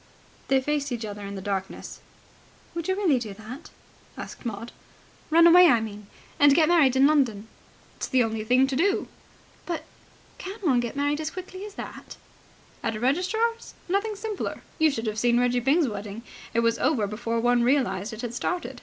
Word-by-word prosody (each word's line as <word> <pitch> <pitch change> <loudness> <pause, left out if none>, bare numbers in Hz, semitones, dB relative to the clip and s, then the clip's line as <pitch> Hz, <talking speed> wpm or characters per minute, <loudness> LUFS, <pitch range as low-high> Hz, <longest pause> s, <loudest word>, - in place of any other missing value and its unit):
They 270 0 +4
faced 285 0 -1
each 235 -2 -3
other 205 -1 -7
in 200 0 -6
the 190 - -7
darkness. 195 -1 -4 0.7
"Would 335 -1 -4
you 375 - +1
really 350 -10 +2
do 215 -4 -6
that?" 230 +8 -10 0.5
asked - - -7
Maud. 230 +1 -6 0.6
"Run 335 +2 +6
away, 355 +1 +8
I 245 -7 +5
mean, 210 -2 -7 0.3
and 285 -1 +6
get 315 -1 +5
married 295 -7 +4
in 265 +1 +5
London." 250 -8 +2 0.5
"It's - - -3
the 260 -2 +3
only 225 -1 -2
thing 250 +4 +4
to 270 0 -2
do." 390 +8 +1 0.6
"But... 340 -2 -3 0.6
can 385 +3 -6
one 275 -10 +3
get 240 0 -3
married 290 +2 0
as 310 - -2
quickly 370 +2 -8
as 415 - -13
that?" - - -9 0.6
"At 225 -1 -2
a - - -5
registrar's? 370 - 0
Nothing 400 +4 0
simpler. 420 -1 -4 0.2
You 315 0 +5
should 235 -5 -3
have 215 0 -2
seen 240 +1 +3
Reggie 245 0 +2
Byng's 280 +5 +3
wedding. 205 0 -6 0.3
It 230 - +1
was 230 0 +1
over 245 -10 +2
before 230 +3 -2
one 245 +1 +3
realized 235 -6 +1
it 220 0 -7
had 240 -2 -4
started. 360 +8 -3
255 Hz, 190 wpm, -26 LUFS, 225-330 Hz, 0.7 s, away